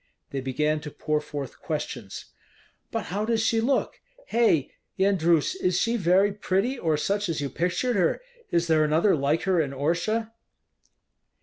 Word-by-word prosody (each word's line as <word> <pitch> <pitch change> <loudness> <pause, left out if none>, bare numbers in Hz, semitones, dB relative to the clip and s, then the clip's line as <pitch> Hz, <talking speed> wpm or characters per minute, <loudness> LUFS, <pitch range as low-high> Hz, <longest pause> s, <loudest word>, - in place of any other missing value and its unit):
They 135 - -3
began 150 +4 0
to 150 0 -7
pour 150 +1 -1
forth 145 -3 -7
questions: 130 -9 -5 0.6
"But - - -3
how 205 +2 0
does 225 0 +1
she 225 0 +2
look? 265 +4 0 0.3
Hei! 225 - +2 0.3
Yendrus, 175 -5 +3
is 180 0 +2
she 230 0 +1
very 195 0 +3
pretty, 205 +5 0
or 160 -2 +1
such 200 +4 -1
as 165 - -1
you 140 -1 -3
pictured 180 +8 0
her? 180 -4 +2 0.3
Is 170 0 +1
there 160 -2 +3
another 160 +6 +3
like 145 +2 0
her 185 -3 +2
in 140 -3 -3
Orsha?" 175 +11 -1
170 Hz, 160 wpm, -26 LUFS, 150-205 Hz, 0.6 s, Yendrus